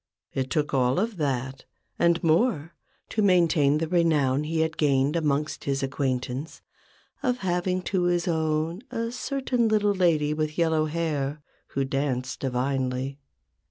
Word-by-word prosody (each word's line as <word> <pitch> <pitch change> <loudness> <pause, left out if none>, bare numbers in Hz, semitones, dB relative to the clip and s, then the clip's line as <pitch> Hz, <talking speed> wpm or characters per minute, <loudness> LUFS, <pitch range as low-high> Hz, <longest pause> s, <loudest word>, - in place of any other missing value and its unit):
It 130 -1 -2
took 150 +1 -1
all 130 -1 +2
of 220 0 -1
that, 135 -3 -2 0.3
and 170 0 +3
more, 165 - +2 0.4
to 220 - 0
maintain 170 -7 +4
the 165 +1 -1
renown 150 -5 +2
he 160 +1 0
had 160 0 0
gained 140 0 +2
amongst 150 -2 -1
his 140 -1 -1
acquaintance 130 +1 -3 0.6
of 250 -1 +1
having 180 +1 0
to 180 -1 0
his 175 +1 +1
own 160 +2 0
a 230 0 -3
certain 250 -2 -1
little 210 -1 +2
lady 160 -6 +2
with 155 0 -2
yellow 160 -2 +2
hair, 150 -3 -2 0.4
who 135 - +1
danced 130 -2 -2
divinely. 130 +1 -2
155 Hz, 140 wpm, -26 LUFS, 135-175 Hz, 0.6 s, maintain